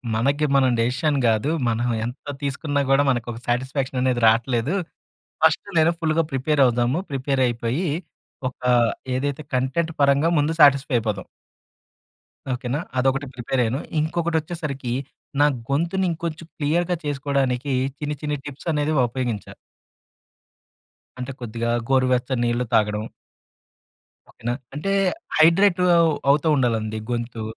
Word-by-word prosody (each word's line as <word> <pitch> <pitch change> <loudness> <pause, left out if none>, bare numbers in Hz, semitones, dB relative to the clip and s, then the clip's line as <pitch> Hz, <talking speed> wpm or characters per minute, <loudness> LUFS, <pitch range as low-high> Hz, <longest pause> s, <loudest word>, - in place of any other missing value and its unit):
మనకి 140 +6 +1
మనం 135 -2 +4
డిసిషన్ 135 +6 +1
కాదు. 110 +6 +2 0.2
మనం 115 +2 0 0.2
ఎంత 125 +3 -7 0.2
తీసుకున్నా 145 +1 -1
కూడా 135 +1 +5
మనకు 120 -3 0
ఒక 115 - -7
సాటిస్ఫాక్షన్ 130 +1 -1
అనేది 125 -2 +1
రావట్లేదు. 120 - +2 0.7
ఫస్ట్ - - +3
నేను 160 +1 +4
ఫుల్‌గా 160 0 +1
ప్రిపేర్ 140 +2 +2
అవుదాము, 120 +5 +1
ప్రిపేర్ 135 0 0
అయిపోయి 120 +9 -2 0.6
ఒక 125 - -14 0.5
ఏదైతే 140 +3 -2
కంటెంట్ 135 +6 0
పరంగా 140 +3 +4
ముందు 150 +2 +1
సాటిస్‌ఫై 140 -2 +5
అయిపోదాం". 105 -3 -3 1.3
ఓకేనా! 125 +3 -2 0.2
అదొకటి 135 +2 +1
ప్రిపేర్ 125 +1 -1
అయ్యాను. 120 +4 -1 0.2
ఇంకొకటి 165 +1 0
వచ్చేసరికి 150 -6 -4 0.5
నా - - +7 0.2
గొంతుని 170 +7 0
ఇంకొంచెం 165 0 -5
క్లియర్‌గా 170 +4 +1
చేసుకోవడానికి 140 -2 -1 0.3
చిన్ని 150 0 -3
చిన్ని 150 -1 -2
టిప్స్ 145 +3 -6
అనేవి 150 0 0
ఉపయోగించా. 120 -3 -4 1.6
అంటే 125 +1 -4
కొద్దిగా 115 0 -3 0.2
గోరువెచ్చ 130 -1 +2
నీళ్లు 120 +1 0
తాగడం. 105 0 +2 1.2
ఓకేనా! 120 +1 -4 0.2
అంటే 155 +7 -2 0.5
హైడ్రేట్ 175 +4 +5 0.2
అవ్ 165 -1 +4 0.2
అవుతూ 145 +3 +3
ఉండాలండి 110 -4 0
గొంతు. 120 -1 -3
135 Hz, 120 wpm, -23 LUFS, 120-150 Hz, 1.6 s, నా